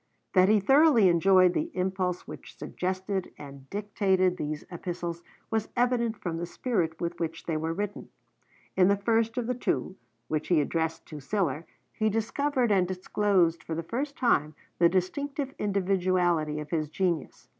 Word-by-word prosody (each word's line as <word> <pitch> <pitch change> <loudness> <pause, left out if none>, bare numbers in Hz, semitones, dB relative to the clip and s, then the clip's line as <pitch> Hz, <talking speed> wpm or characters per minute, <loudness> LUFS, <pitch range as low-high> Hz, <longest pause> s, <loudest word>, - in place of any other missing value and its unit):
That 185 0 +5
he 215 0 +5
thoroughly 270 - +5
enjoyed 185 +1 +5
the 315 - -1
impulse 185 -1 -1
which - - -10
suggested 185 +1 -3
and 140 -2 -11
dictated 195 -3 +1
these 150 -2 -4
Epistles 170 -1 -5 0.3
was 220 -1 -1
evident 240 -2 +1
from 170 -5 -4
the 170 +1 -4
spirit 175 -7 -1
with 170 0 -3
which 165 -1 -4
they 165 - -1
were 160 +1 -1
written. 205 +4 -4 0.7
In 185 -1 +5
the 200 +1 +3
first 225 +3 +1
of 245 - 0
the 250 - 0
two, 235 -5 -2 0.3
which 155 0 -2
he 175 -3 +4
addressed 160 +2 -1
to 155 - -7
Sillar, 160 0 -1 0.3
he 220 0 +1
discovered 240 +3 0
and 185 -3 +3
disclosed 185 -2 +1
for 160 - -4
the 165 - -3
first 275 - -3
time 155 - +2 0.2
the 170 0 +6
distinctive 275 - -2
individuality 180 -6 +1
of 150 0 -8
his 155 -3 -1
genius. 170 -3 -2
185 Hz, 160 wpm, -28 LUFS, 165-215 Hz, 0.7 s, the